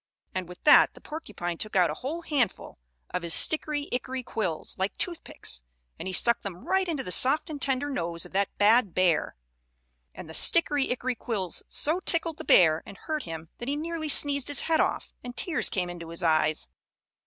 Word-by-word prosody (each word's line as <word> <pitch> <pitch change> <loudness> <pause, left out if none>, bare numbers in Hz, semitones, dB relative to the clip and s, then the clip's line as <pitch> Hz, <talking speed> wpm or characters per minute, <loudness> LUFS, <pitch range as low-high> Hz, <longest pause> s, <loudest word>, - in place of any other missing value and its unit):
And 185 -2 -4
with 180 - -13
that 300 - +6
the - - -12
porcupine 205 - -6
took 215 -1 -4
out 180 -3 +3
a - - -9
whole 315 +7 -5
handful 265 - -2 0.3
of 180 - -2
his 170 -1 -1
stickery 300 -2 +2
ickery 255 0 -4
quills, 180 -8 -3
like 190 +1 -2
toothpicks, 320 - -4 0.4
and - - -6
he - - -3
stuck 235 +6 +5
them 185 -3 -8
right 380 0 +1
into 295 -5 -2
the 180 - -6
soft 275 - +5
and 290 -2 -7
tender 270 +1 0
nose 170 -11 -3
of - - -13
that 195 +1 0
bad 210 -2 +3
bear. 180 -4 +1 0.8
And - - -9
the 160 - -10
stickery 290 - +3
ickery 250 0 -2
quills 200 -7 -3
so 315 +5 0
tickled 330 -3 -1
the - - -5
bear 160 -3 +5
and 195 - -12
hurt 310 -1 -4
him 160 -1 -8
that 240 - -5
he 285 - 0
nearly 315 0 -4
sneezed 280 -2 +4
his 290 - +3
head 320 -1 +1
off, - - -1
and 245 0 -9
tears 340 -4 +1
came 180 -2 -2
into 170 -2 -8
his 170 +2 -2
eyes. 155 - +1
240 Hz, 200 wpm, -27 LUFS, 175-295 Hz, 0.8 s, that